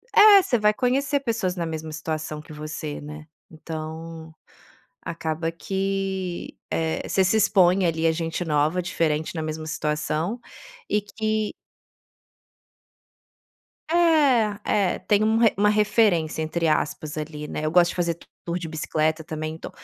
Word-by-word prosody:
é, 415 -2 +9
você 245 - +1
vai 210 0 +4
conhecer 275 +4 +1
pessoas 220 -7 -1
na 170 - -2
mesma 160 -1 -5
situação 155 -1 -4
que 155 - -15
você, 155 0 -6
né. 150 +1 -9 0.2
Então, 160 0 -7 0.7
acaba 165 0 -3
que, 190 0 -3
eh, 160 -1 -1
você 190 - +3
se 190 +4 +2
expõe 185 -3 +4
ali 165 0 +1
à 160 - +4
gente 165 +1 -3
nova, 155 +3 +1
diferente, 160 -2 -1
na 160 - -3
mesma 155 0 -4
situação 155 +6 -2 0.5
e 210 - +2
que 215 +1 -2 2.4
É. 315 -7 +4 0.2
É, 195 -4 +1
tem 210 0 +2
um 220 +1 +3
re 230 -2 +5
uma 210 +1 +3
referência, 210 -7 +2
entre 165 +1 -1
aspas, 150 0 -1
ali, 150 -1 -5
né. 155 - -4
Eu 155 - 0
gosto 175 0 +5
de - - -8
fazer 170 -1 0 0.3
tour 170 +1 -2
de 165 -2 -6
bicicleta 155 0 -1
também. 155 0 -4
Então 160 - -8
165 Hz, 145 wpm, -24 LUFS, 155-205 Hz, 2.4 s, é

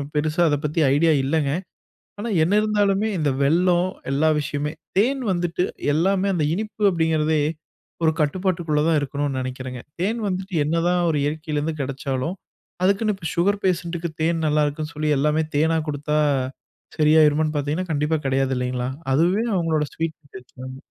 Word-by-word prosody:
பெருசா 155 +3 0
அத 145 - +2
பத்தி 155 +2 0
ஐடியா 160 +2 +4
இல்லங்க. 140 0 +1 0.7
ஆனா 230 +3 -3
என்ன 180 +5 +1
இருந்தாலுமே 210 0 +1
இந்த 145 -3 +1
வெள்ளோம் 175 +4 +3 0.2
எல்லா 150 +3 +3
விஷயமே! 145 +1 -3 0.3
தேன் 260 +4 +1
வந்துட்டு 175 0 0 0.3
எல்லாமே 190 +4 +2
அந்த 155 -3 +1
இனிப்பு 215 +1 -4
அப்டிங்கிறதே 160 -2 +1 0.6
ஒரு 160 - +4
கட்டுப்பாட்டுக்குள்ள 170 -1 0
தா 165 - +3
இருக்கனும்னு 140 -1 -2
நெனைக்கிறேங்க. 130 -1 -6 0.2
தேன் 220 +5 0
வந்துட்டு 185 +1 -4
என்னதா 170 +3 +1 0.2
ஒரு 150 - 0
இயற்கையில 155 0 -2
இருந்து 155 0 -3
கெடச்சாலும் 135 +4 -3 0.5
அதுக்குனு 200 +3 +2
இப்போ 170 -4 -6
சுகர் 200 +4 +1
பேஷன்ட்‌க்கு 170 -2 -1
தேன் 165 0 +1
நல்லாருக்குன் 150 +1 0
சொல்லி 155 +1 -2
எல்லாமே 150 +3 +2
தேனா 160 +2 +3
குடுத்தா 150 +1 -1 0.8
சரியாயிருமான்னு 155 0 +4
பார்த்தீங்கனா, 150 +5 -1
கண்டிப்பா 150 +1 +1
கெடையாதுல்லிங்களா? 130 -2 0 0.2
அதுவே 180 - +2
அவங்களோட 165 -3 +1
ஸ்வீட் 165 -1 -3 0.2
டேஸ்ட்மாரி 130 +1 -10
160 Hz, 140 wpm, -23 LUFS, 145-180 Hz, 0.8 s, ஐடியா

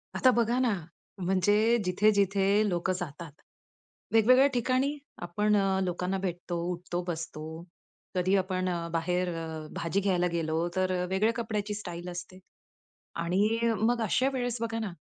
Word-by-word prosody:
आता 255 - +5
बघा 235 +1 +2
ना, 245 -4 +2 0.4
म्हणजे 205 +5 +3
जिथे, 185 +4 +3
जिथे 200 -1 +2 0.3
लोकं 175 +1 0
जातात. 165 -2 -6 0.8
वेगवेगळ्या 255 +5 +6
ठिकाणी 255 +4 +1 0.3
आपण 210 +4 +1
अ, 195 -1 +2
लोकांना 180 +1 -1
भेटतो, 175 -1 -3
उठतो, 175 0 -3
बसतो. 160 -2 -5 0.7
कधी 185 +2 +2
आपण 185 -1 -1
अ, 170 -1 -2
बाहेर 180 +2 0
अ, 160 -1 -5
भाजी 170 +3 0
घ्यायला 180 -3 +2
गेलो, 165 0 0
तर 185 0 +1
अ, - - -1
वेगळ्या 205 +4 +2
कपड्याची 215 -3 -2
स्टाईल 180 -4 -6
असते. 180 +1 -8 0.8
आणि 180 +3 +1 0.3
अ, - - +2
मग 235 +2 +2
अशा 255 +5 +2
वेळेस 245 -2 -1
बघा 225 0 -2
ना, 210 -5 -4
190 Hz, 145 wpm, -29 LUFS, 175-220 Hz, 0.8 s, वेगवेगळ्या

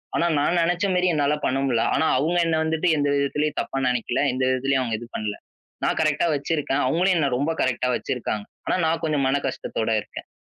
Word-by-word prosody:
ஆனா - - +2
நான் 165 +5 +1
நெனைச்ச 175 +3 +1
மாரி 180 0 +2
என்னால 145 -1 +2
பண்ண 130 - +1
முடில. 120 -4 +1
ஆனா - - +2
அவங்க 160 +6 +1
என்னை 160 -1 +1
வந்துட்டு 160 +2 0
எந்த 145 0 +1
விதத்துலயும் 145 +2 0
தப்பா 135 - -5
நினைக்கல. 125 -1 -1
எந்த 130 +1 -1
விதத்துலயும் 135 +1 +1
அவங்க 115 -3 -2
எது 120 - -9
பண்ல. 105 -1 -3 0.5
நான் - - 0
கரெக்ட்டா 155 +1 +2
வச்சிருக்கேன். 145 -1 -1
அவங்களும் 180 +7 +2
என்னை 145 -4 +2
ரொம்ப 145 +5 0
கரெக்ட்டா 125 0 0
வச்சிருக்காங்க. 110 -4 -3 0.2
ஆனா - - +1
நான் 165 +1 0
கொஞ்சம் 150 -3 +1
மனக்கஷ்டத்தோட 135 -5 -2
இருக்கேன். - - -10
145 Hz, 190 wpm, -23 LUFS, 130-160 Hz, 0.5 s, ஆனா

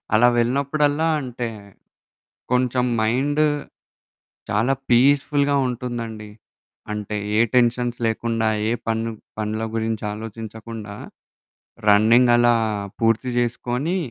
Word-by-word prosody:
అలా 120 +3 +6
వెళ్ళినప్పుడల్లా, 145 +5 +1
అంటే 125 -2 -4 1.1
కొంచెం 125 0 +2 0.2
మైండ్ 135 +7 +1 1.1
చాలా 115 +6 +2 0.2
పీస్ఫుల్‌గా 140 +3 +3
ఉంటుందండి. 115 -3 -5 0.6
అంటే 105 0 -4 0.2
ఏ - - +5
టెన్షన్స్ 120 0 +2
లేకుండా, 115 0 0 0.2
ఏ - - +2 0.2
పన్ను 115 0 -1 0.3
పనుల 110 +1 -2
గురించి 110 -1 -2
ఆలోచించకుండా, 110 0 -8 0.9
రన్నింగ్ 115 +4 +5
అలా 120 0 +4 0.5
పూర్తి 115 +2 +2
చేసుకొని, 125 +7 -1
120 Hz, 90 wpm, -22 LUFS, 110-125 Hz, 1.1 s, అలా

